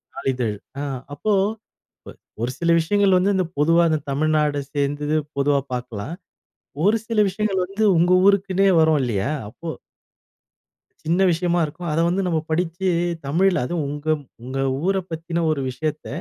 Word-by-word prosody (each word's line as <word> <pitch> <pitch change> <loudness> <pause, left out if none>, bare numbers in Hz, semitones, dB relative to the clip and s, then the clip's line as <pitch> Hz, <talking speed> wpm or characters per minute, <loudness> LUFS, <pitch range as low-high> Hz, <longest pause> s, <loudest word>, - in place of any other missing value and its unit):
"நாளிதழ்" 125 -5 -1 0.3
அ - - -3 0.3
அப்போ 210 +8 0 1.1
ஒரு 120 +2 -1
சில 170 0 +1
விஷயங்கள் 195 +3 +3
வந்து, 195 +3 +2
இந்தப் 180 -2 -2
பொதுவா 165 +3 +4 0.3
தமிழ்நாடு 150 0 +1
சேர்ந்தது 145 +2 0 0.2
பொதுவா 140 0 +2
பார்க்கலாம். 125 +2 -5 0.7
ஒரு 215 +2 +4
சில 230 -2 0
விஷயங்கள் 195 -1 -1
வந்து 200 +4 -3
உங்க 175 +2 +3
ஊருக்குனே 195 -1 +3
வரும் 160 -1 +4
இல்லையா, 110 -2 -1 0.2
அப்போ 135 +8 -11 1.4
சின்ன 170 +4 +1
விஷயமா 175 +1 +1
இருக்கும். 165 +3 -6
அத 160 - 0
வந்து 180 +3 +1
நம்ம 165 -3 +1
படிச்சு 175 +3 -1 0.4
தமிழ்ல 175 +2 +2
அதுவும் 165 +3 -2
உங்க 145 +1 -7 0.4
உங்க 130 +2 -5 0.3
ஊர 195 0 +2
பத்தின 165 +1 -3
ஒரு 145 -3 -1
விஷயத்த 150 +4 -4
165 Hz, 135 wpm, -22 LUFS, 145-185 Hz, 1.4 s, பொதுவா